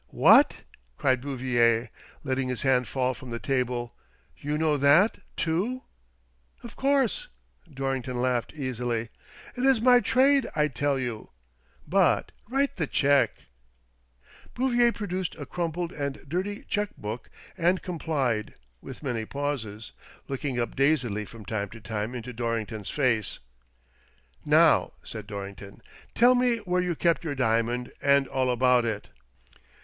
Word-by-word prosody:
"What! - - +5 0.2
" - - -39
cried 130 -3 +2
Bouvier, 120 -4 +1 0.3
letting 135 -2 -1
his 125 -3 -3
hand 125 -3 +2
fall 130 -1 0
from 130 0 -11
the 115 - -3
table, 125 -2 -2 0.2
" - - -36
you 150 +1 -2
know 155 -1 +2
that 145 +9 +4 0.2
too? 195 +10 -1 0.4
" - - -37
"Of 235 - -10
course," 275 - +1 0.4
Dorrington 135 -2 -3
laughed, 125 -1 0
easily; 120 -4 -3 0.5
"it 250 - -3
is 265 -3 +5
my 245 +1 +6
trade, 265 +1 +3
I 150 -1 +2
tell 140 +2 0
you. 120 -4 -4 0.6
But - - +2 0.2
write 275 +2 0
the 160 - -1
cheque." 140 -4 +2 1.1
Bouvier 240 -2 +3
produced 185 -5 -4
a 145 - -7
crumpled 170 +2 -3
and 140 -1 -5
dirty 190 +7 -3
cheque 205 -1 -2
book 110 +3 -6 0.3
and 180 +2 +1
complied, 140 -11 -2 0.3
with 130 +2 -10
many 115 -5 -2
pauses, 120 -7 -4 0.4
looking 135 -2 -3
up 120 -2 -2
dazedly 130 -7 +1
from 110 0 -12
time 100 -1 -3
to 115 - -11
time 110 +2 -4
into 125 +1 -6
Dorrington's 115 -3 -3
face. 120 -8 0 1.1
"Now," - - +4
said 110 -1 -8
Dorrington, 100 -1 -8 0.3
"tell 245 +2 +6
me 245 -1 +2
where 180 -4 -1
you 180 -2 -1
kept 170 +2 +1
your 150 -4 -3
diamond, 120 0 0
and 140 -1 +4
all 130 -1 0
about 125 0 +3
it." 110 -3 -3
135 Hz, 140 wpm, -27 LUFS, 115-170 Hz, 1.1 s, my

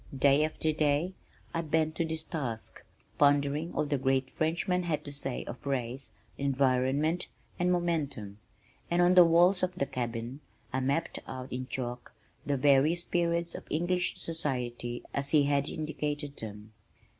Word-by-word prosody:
Day 140 +2 +5
after 155 0 0
day 150 +4 +1 0.4
I 165 - 0
bent 155 0 +1
to 165 - +1
this 160 0 -3
task, 120 -11 -5 0.4
pondering 145 +3 +3
all - - +1
the 145 -2 0
great 130 0 +1
Frenchman 170 +3 0
had 165 -4 -2
to 145 - -6
say 135 -2 -3
of 120 - -8
race, 130 -1 -2 0.3
environment, 140 +4 +2 0.3
and 180 0 +2
momentum 145 - -1 0.5
and 175 - +2
on 175 +1 +5
the 180 -1 +9
walls 175 +3 +5
of 185 0 0
the 155 - 0
cabin 120 +1 -4 0.3
I 130 - +1
mapped 140 +5 0
out 130 -1 -6
in 130 0 -3
chalk 125 -2 -5 0.3
the 140 -1 +1
various 145 +5 +4
periods 170 -1 0
of - - -8
English 175 +3 0
society 125 -6 -3
as 140 0 -1
he 150 -1 +5
had 140 0 +1
indicated 150 -2 -3
them. 105 0 -8
145 Hz, 155 wpm, -30 LUFS, 130-165 Hz, 0.5 s, the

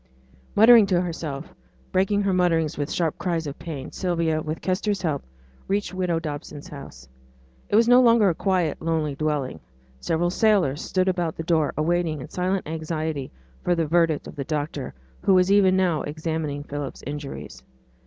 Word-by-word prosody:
Muttering 225 -1 +8
to 180 -3 +2
herself, 165 -5 -4 0.4
breaking 200 +2 +2
her 195 -1 +1
mutterings 165 -4 +2
with 145 +1 -3
sharp 165 -3 -1
cries 170 -3 -1
of 145 -1 -6
pain, 145 -6 -6
Sylvia, 165 -4 0
with 155 +1 -4
Kester's 195 +1 -1
help, 155 -5 0 0.5
reached 200 0 -1
widow 180 -3 0
Dobson's 150 0 -7
house. 140 - -10 0.6
It - - +1
was 230 +2 +5
no 245 +1 +7
longer 230 -4 +5
a 180 - +3
quiet, 180 -3 0
lonely 160 -3 0
dwelling. 145 -2 -2 0.4
Several 170 - 0
sailors 185 -9 +2
stood 185 0 0
about 175 -3 0
the 165 - -3
door, 160 -3 +2
awaiting, 165 0 0
in 130 - -8
silent 185 0 -1
anxiety, 155 -3 -3 0.3
for 175 - +2
the 165 -1 0
verdict 165 -1 +2
of - - -10
the 140 - -3
doctor, 145 - -4 0.3
who 195 - +4
was 185 +1 +4
even 190 -2 +5
now 175 -5 +2
examining 155 -1 -3
Philip's 145 -1 -6
injuries. 140 - -7
165 Hz, 165 wpm, -24 LUFS, 150-185 Hz, 0.6 s, Muttering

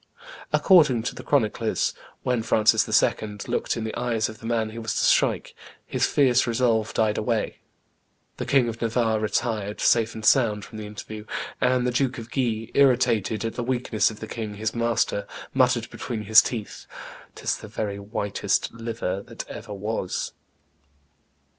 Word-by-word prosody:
According 150 - +5
to - - -2
the - - -8
chroniclers, 115 -4 0 0.3
when 125 -2 +1
Francis 110 -1 +3
II. 105 -1 -2
looked 120 0 -1
in 115 - -3
the 110 - -4
eyes 115 -3 0
of 110 - -10
the 115 - -7
man 110 -2 0
he 115 - -7
was 115 -1 -3
to - - +1
strike, - - +2 0.3
his - - 0
fierce 130 -3 +3
resolve 115 -2 +1
died 110 -1 +2
away: 110 0 -1 0.8
the - - -4
King 135 -4 +4
of 115 -1 -5
Navarre 115 -1 +1
retired, 105 -1 -1
safe 115 -1 +3
and 110 -1 -6
sound, 110 -5 +3
from 110 - -10
the 105 - -6
interview, 105 +1 -8 0.4
and 125 0 +2
the 125 - +1
Duke 130 +1 0
of 115 0 -9
Guise, 115 -4 -1
irritated 120 -5 +3
at 115 - -2
the 120 - -3
weakness 120 -3 +1
of 110 -1 -10
the 110 - -5
king 110 -3 -5
his 110 +2 -2
master, 115 -3 0 0.3
muttered - - +2
between 110 -3 -5
his 105 +1 +8
teeth, 110 -4 -6 0.5
"'Tis - - -1
the - - -10
very 100 -2 -4
whitest 100 -1 -1
liver 115 -4 -3
that - - -8
ever - - -8
was." 100 -2 -3
115 Hz, 165 wpm, -25 LUFS, 110-120 Hz, 0.8 s, his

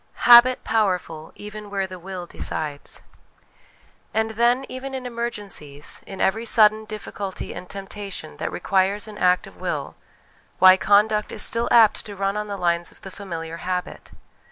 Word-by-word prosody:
Habit 245 +1 +8
powerful 180 -7 -1
even 210 0 -9
where 195 -1 -1
the 185 -1 -9
Will 185 0 -7
decides. 150 -4 -4 1.1
And 220 0 +1
then, 240 +4 +2
even 265 +1 -6
in 260 -1 -5
emergencies, 205 -12 -4
in 195 - -8
every 220 +4 +1
sudden 215 -1 +4
difficulty 205 -2 -6
and 180 - -9
temptation 195 - -7
that - - -3
requires 195 +2 0
an 210 -1 -10
act 180 -1 +3
of - - -15
will, - - -4 0.6
why, 185 0 +8
conduct 210 +2 +2
is - - -1
still 230 +1 +2
apt 225 -3 +5
to 205 - -8
run 195 +1 -1
on 210 0 -3
the 200 -1 -5
lines 170 -1 0
of - - -22
the 190 - -9
familiar 165 -4 -6
habit. 180 +1 -4
200 Hz, 155 wpm, -23 LUFS, 185-220 Hz, 1.1 s, Habit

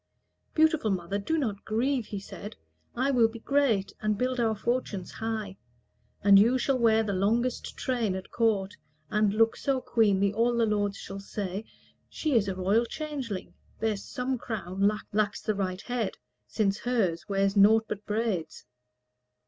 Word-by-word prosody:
"Beautiful 315 -7 +3
mother, 190 +1 -1
do 320 +11 -1
not 215 -9 -2
grieve," 240 +2 0
he 205 - -4
said; 205 +1 -9 0.4
"I 265 +3 +1
will 240 -4 +5
be 225 +1 -9
great, 230 -6 +1
and 215 -1 0
build 255 +2 -1
our 225 -2 +2
fortunes 210 -3 -2
high. 220 -3 -4 0.7
And 200 0 +8
you 235 +5 +4
shall 260 +1 +1
wear 225 -1 +4
the 205 -2 -2
longest 230 +6 0
train 235 -7 -1
at 190 - -7
court, 205 -4 +1 0.4
And 210 -1 +3
look 225 +2 +3
so 275 -2 0
queenly, 200 -5 +2
all 235 +3 +2
the 230 - +3
lords 205 -2 0
shall 195 0 -7
say, 195 +1 -5 0.4
'She 310 -3 -2
is 220 -5 +3
a 190 - -2
royal 200 +6 +2
changeling: 275 -11 -5 0.3
there 220 -1 +1
is 200 - -7
some 255 0 -3
crown 195 -4 0 0.2
Lacks 210 -1 0
the 215 - 0
right 190 -1 -2
head, 245 -4 -2 0.3
since 200 -2 0
hers 205 -10 -1
wears 195 0 +1
naught 220 +2 +6
but 210 0 -5
braids.'" 210 - -2
215 Hz, 165 wpm, -28 LUFS, 200-240 Hz, 0.7 s, And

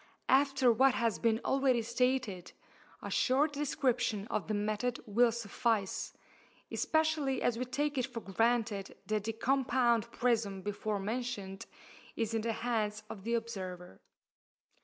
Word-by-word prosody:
After 270 -2 +4
what 260 +3 +4
has 230 -2 0
been 225 -1 +2
already 265 -3 +2
stated, 235 -5 -1 0.5
a - - -5
short 285 +4 +2
description 250 -7 0
of - - -2
the 215 - -1
method 215 +4 -1
will 230 +3 +4
suffice, 225 -2 -1 0.6
especially 315 -4 +1
as 235 -1 +1
we 255 - -1
take 290 +2 -1
it 255 - 0
for 245 -3 -6
granted 220 -1 0
that 210 0 -1
the 225 - -1
compound 240 -2 +2
prism 215 -7 0
before 205 +1 -2
mentioned 205 -2 -4 0.5
is 225 -1 -1
in 225 - +1
the 225 +1 -1
hands 215 -3 -1
of 195 - -8
the 235 +2 0
observer. 185 - -5
230 Hz, 140 wpm, -32 LUFS, 210-255 Hz, 0.6 s, After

